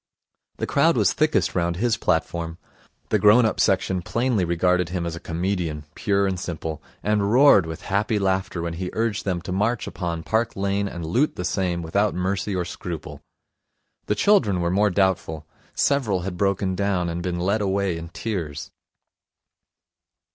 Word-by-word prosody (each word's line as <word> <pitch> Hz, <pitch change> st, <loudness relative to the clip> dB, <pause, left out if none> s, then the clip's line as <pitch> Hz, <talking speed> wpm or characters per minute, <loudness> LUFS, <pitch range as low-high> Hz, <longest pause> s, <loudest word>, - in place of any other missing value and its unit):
The -, -, -2 dB
crowd -, -, +3 dB
was -, -, +3 dB
thickest -, -, +1 dB
round 85 Hz, -1 st, 0 dB
his 115 Hz, +5 st, +1 dB
platform. 85 Hz, -1 st, -1 dB, 0.5 s
The -, -, +2 dB
grown 110 Hz, +3 st, +6 dB
up 110 Hz, -, -1 dB
section 95 Hz, -1 st, +2 dB
plainly 115 Hz, +1 st, 0 dB
regarded 90 Hz, +1 st, +1 dB
him 90 Hz, -1 st, -3 dB
as 85 Hz, -1 st, -3 dB
a -, -, -7 dB
comedian, 85 Hz, -3 st, -2 dB
pure 100 Hz, 0 st, +1 dB
and 95 Hz, -2 st, -1 dB
simple, 80 Hz, -4 st, -5 dB, 0.2 s
and 105 Hz, -1 st, +1 dB
roared 125 Hz, -, +6 dB
with 80 Hz, 0 st, -7 dB
happy 105 Hz, +3 st, 0 dB
laughter 95 Hz, -3 st, -1 dB
when 85 Hz, -1 st, -3 dB
he 90 Hz, +2 st, -4 dB
urged 110 Hz, -1 st, -1 dB
them 90 Hz, -3 st, -1 dB
to 90 Hz, -, -5 dB
march 105 Hz, +5 st, 0 dB
upon 85 Hz, -3 st, -4 dB
Park 110 Hz, +4 st, 0 dB
Lane 100 Hz, +1 st, 0 dB
and 85 Hz, -4 st, -6 dB
loot 125 Hz, -, +1 dB
the 90 Hz, -, -4 dB
same 90 Hz, -2 st, -1 dB
without 100 Hz, +6 st, +1 dB
mercy 95 Hz, +2 st, -1 dB
or 90 Hz, -1 st, -1 dB
scruple. 85 Hz, -2 st, -7 dB, 0.9 s
The 105 Hz, -, +1 dB
children 105 Hz, -, +3 dB
were 85 Hz, 0 st, 0 dB
more 105 Hz, +3 st, +3 dB
doubtful. 95 Hz, -5 st, 0 dB, 0.3 s
Several 115 Hz, -10 st, +1 dB
had 90 Hz, 0 st, -4 dB
broken 95 Hz, 0 st, 0 dB
down, 95 Hz, -2 st, 0 dB
and 85 Hz, +1 st, -3 dB
been 85 Hz, 0 st, -2 dB
led 100 Hz, +5 st, +1 dB
away 100 Hz, -2 st, 0 dB
in 80 Hz, 0 st, -7 dB
tears. 80 Hz, -7 st, -4 dB
95 Hz, 170 wpm, -23 LUFS, 85-100 Hz, 0.9 s, grown